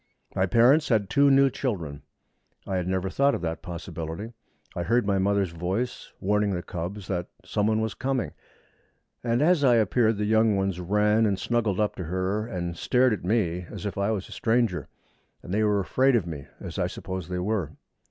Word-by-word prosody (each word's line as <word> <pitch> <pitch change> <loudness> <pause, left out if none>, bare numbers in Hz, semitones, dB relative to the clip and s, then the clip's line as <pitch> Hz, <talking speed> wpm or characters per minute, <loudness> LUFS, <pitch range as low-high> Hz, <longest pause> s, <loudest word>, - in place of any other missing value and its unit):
My 95 - +2
parents 130 - +4
had 105 -5 +1
two 140 0 +5
new 135 0 +5
children. 85 - -3 0.6
I 95 - -2
had 90 -1 -2
never 95 0 0
thought 140 +8 +2
of - - -5
that 80 -1 -3
possibility. 85 +4 -6 0.4
I 85 - -2
heard 115 +5 +2
my 100 -1 +1
mother's 100 -2 +1
voice 95 +9 -3
warning 105 0 +1
the 90 - -4
cubs 90 +3 -5
that 90 -2 -2 0.2
someone 110 +1 +1
was 110 -1 -2
coming, 130 -2 -2 0.9
and 120 +3 +1
as 170 -2 +4
I 125 -3 +6
appeared 110 0 +2
the 105 - -1
young 110 0 +3
ones 95 -2 -1
ran 105 +4 +2
and 100 -2 0
snuggled 110 -3 0
up 105 -1 +1
to 90 - -4
her, 95 +5 -1
and 85 -5 -4
stared 125 +7 +2
at 105 - -4
me 90 -4 0
as - - -7
if 100 - -3
I 100 +1 0
was 105 -4 -2
a - - -15
stranger 115 - 0 0.6
and 90 - -6
they 105 - +2
were 105 -1 +2
afraid 130 +7 +2
of 110 -7 +1
me, 75 -5 -7
as - - -6
I - - +1
suppose 95 -3 -6
they 90 - -2
were. 90 -4 -1
100 Hz, 195 wpm, -26 LUFS, 90-115 Hz, 0.9 s, I